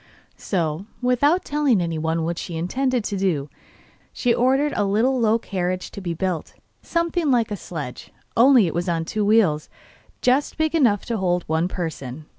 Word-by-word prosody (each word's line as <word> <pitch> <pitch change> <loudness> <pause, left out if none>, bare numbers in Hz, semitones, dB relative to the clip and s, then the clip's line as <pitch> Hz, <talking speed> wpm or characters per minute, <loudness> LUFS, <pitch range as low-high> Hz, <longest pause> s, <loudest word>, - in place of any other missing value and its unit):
So, 170 0 -2
without 270 +8 +2
telling 285 -7 +2
anyone 165 -1 -1
what 165 +1 -2
she 170 - -5
intended 250 +8 0
to 205 -1 -3
do, 160 -7 -1 0.6
she 245 -2 +1
ordered 270 +5 +2
a 205 - +1
little 225 +7 +2
low 225 -1 +3
carriage 185 -4 -3
to 200 - -8
be 170 -3 -3
built, 180 -1 -3 0.3
something 335 -2 0
like 235 -4 +2
a - - -1
sledge, 150 -9 -7 0.2
only 245 -2 +6
it 165 - -2
was 175 +2 -1
on 165 -1 -1
two 215 +5 -2
wheels 200 -8 +3 0.5
just 260 +3 +2
big 315 0 0
enough 240 - +3
to 230 - -2
hold 180 -3 0
one 160 +2 0
person. 155 -6 -5
200 Hz, 170 wpm, -23 LUFS, 170-250 Hz, 0.6 s, only